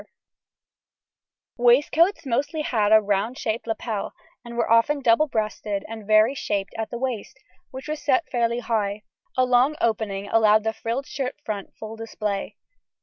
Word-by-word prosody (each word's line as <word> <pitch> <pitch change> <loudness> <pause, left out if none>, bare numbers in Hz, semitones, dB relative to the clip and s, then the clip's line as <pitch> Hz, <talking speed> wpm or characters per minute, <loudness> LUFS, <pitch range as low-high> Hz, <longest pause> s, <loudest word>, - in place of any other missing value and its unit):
] - - -69
Waistcoats 295 +8 +3
mostly 285 +5 -1
had 215 -6 +1
a 220 - +8
round 210 +4 -1
shaped 225 +1 -3
lapel, 220 -2 -3 0.3
and 235 0 -9
were 235 - +1
often 230 +6 +3
double 255 +4 +3
breasted 215 -4 -2
and 220 -2 -8
very 215 +4 +5
shaped 205 -7 -3
at 225 -1 -3
the 240 - -5
waist, 250 -2 -4 0.3
which 265 +3 -9
was 305 0 -4
set 290 +3 +2
fairly 235 -1 0
high; 210 -3 -1 0.3
a 255 - +4
long 250 +4 +3
opening 205 -3 -1
allowed 215 0 +4
the 220 0 -1
frilled 235 +5 -3
shirt 270 -3 -4
front 205 -3 -5
full 220 0 -7
display. 215 -3 -4
230 Hz, 155 wpm, -24 LUFS, 215-255 Hz, 0.3 s, a